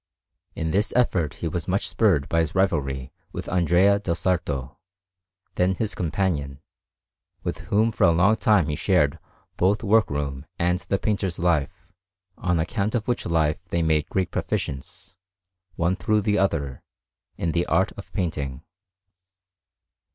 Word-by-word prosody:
In 80 0 -2
this 100 +5 +1
effort 90 - +1
he 85 - -4
was 85 +1 -3
much 95 +3 0
spurred 90 -11 +2
by 85 - +1
his 80 -3 -1
rivalry 70 -9 0 0.2
with - - -6
Andrea 90 +3 +3
del 90 -5 -1
Sarto, 85 -8 -2 0.7
then 90 +1 +1
his 110 +2 -2
companion, 80 -5 -1 0.8
with - - -3
whom 110 +3 +3
for 105 -2 +2
a 85 - +6
long 90 +6 +4
time 105 -9 +3
he 75 - -1
shared 85 -3 +2 0.4
both 100 +5 +2
work 110 +1 +4
room 70 0 -3
and 90 +1 +1
the 100 - -1
painter's 95 -4 -1
life; 85 0 0 0.5
on 90 -2 0
account 100 +7 -1
of 115 0 -1
which 120 -1 -1
life 80 -3 +1
they 85 0 0
made 80 -2 +1
great 95 -2 -1
proficience, 65 +5 -4 0.6
one 85 +2 +1
through 105 +4 +1
the 105 0 +1
other, 70 -9 -1 0.6
in 85 - -1
the 85 +2 0
art - - +2
of - - -11
painting. 70 -7 -3
85 Hz, 150 wpm, -24 LUFS, 75-100 Hz, 0.8 s, a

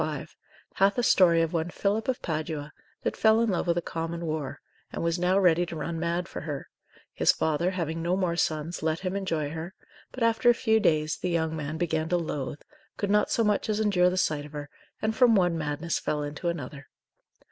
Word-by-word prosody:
5, - - -4 0.4
hath 195 +3 +3
a 245 - +1
story 170 -6 +5
of 165 - -2
one 165 0 0
Philip 205 +6 -1
of 260 -1 -1
Padua 155 -2 -3 0.3
that - - -1
fell 220 0 +4
in 230 -2 +2
love 180 - -1
with 170 0 +2
a 175 - 0
common 165 +1 -4
whore, 155 -4 -3 0.4
and - - -4
was 170 +1 0
now 180 +2 +2
ready 175 -3 +4
to 165 - -6
run 165 +2 -3
mad 170 +1 -1
for - - -7
her; 145 -3 -5 0.5
his - - +4
father 160 +3 0
having 165 -3 -3
no 175 +3 0
more 180 -3 0
sons 160 0 -1
let 160 +1 -1
him 185 0 -2
enjoy 165 -7 -1
her; 165 +3 -6 0.4
but 255 - -3
after 230 +1 +4
a 240 - +6
few 220 -2 +2
days, 155 -6 +1
the 180 - -2
young 160 -2 0
man 155 0 -4
began 160 -1 -1
to 180 - +2
loath, 150 -4 -4 0.3
could 200 -1 -1
not 210 0 +3
so 230 - +2
much 210 0 +1
as 215 0 +1
endure 190 -4 +3
the 185 - -3
sight 155 -5 +1
of 150 0 -12
her, 145 -1 -6 0.3
and 220 0 0
from 240 -2 +5
one 175 -3 +3
madness 155 +1 -2
fell 150 -1 -2
into 145 +4 -4
another. 145 -4 -4
170 Hz, 220 wpm, -27 LUFS, 155-190 Hz, 0.5 s, a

